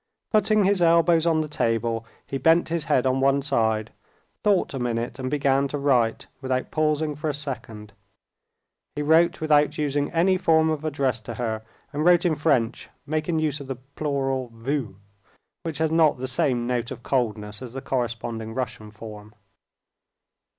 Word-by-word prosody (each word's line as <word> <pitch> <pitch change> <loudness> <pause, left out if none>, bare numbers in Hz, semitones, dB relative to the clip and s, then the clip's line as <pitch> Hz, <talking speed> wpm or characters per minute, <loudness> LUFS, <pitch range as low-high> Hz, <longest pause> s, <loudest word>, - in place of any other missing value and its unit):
Putting 215 -1 +3
his 195 -1 +2
elbows 170 0 +4
on 160 -1 +3
the 155 - -3
table, 115 -4 -1 0.2
he 135 - -4
bent 165 +6 +4
his 165 -1 -2
head 135 -4 +2
on 130 0 +2
one 140 +1 +2
side, 110 -5 0 0.5
thought 200 -7 +2
a 135 - -3
minute, 120 +1 -2
and 130 0 -2
began 140 -1 +2
to 145 - -4
write, 125 -5 +1 0.2
without 130 -1 -2
pausing 155 0 +1
for 150 +2 -3
a 145 - -2
second. 115 -7 -7 1.0
He 150 - -2
wrote 160 +4 +4
without 150 -1 +3
using 145 -1 -1
any 185 +3 +2
form 160 -1 +3
of 155 -1 -3
address 140 -6 0
to 115 +1 -8
her, 110 -2 -2 0.3
and 150 +2 -1
wrote 175 +1 +5
in 170 - +3
French, 140 -6 0 0.2
making 155 +2 -1
use 155 -2 0
of 140 - -9
the 135 - -3
plural 135 -1 -3
"vous," 115 -2 -3 0.7
which 160 -3 -4
has 160 0 0
not 160 -3 +4
the 130 - -4
same 125 -1 +1
note 120 -1 -1
of 120 - -8
coldness 105 -4 -1
as 125 -2 -8
the 135 - -4
corresponding 115 -3 -3
Russian 115 -4 -4
form. 105 -1 -11
140 Hz, 170 wpm, -24 LUFS, 120-155 Hz, 1.0 s, wrote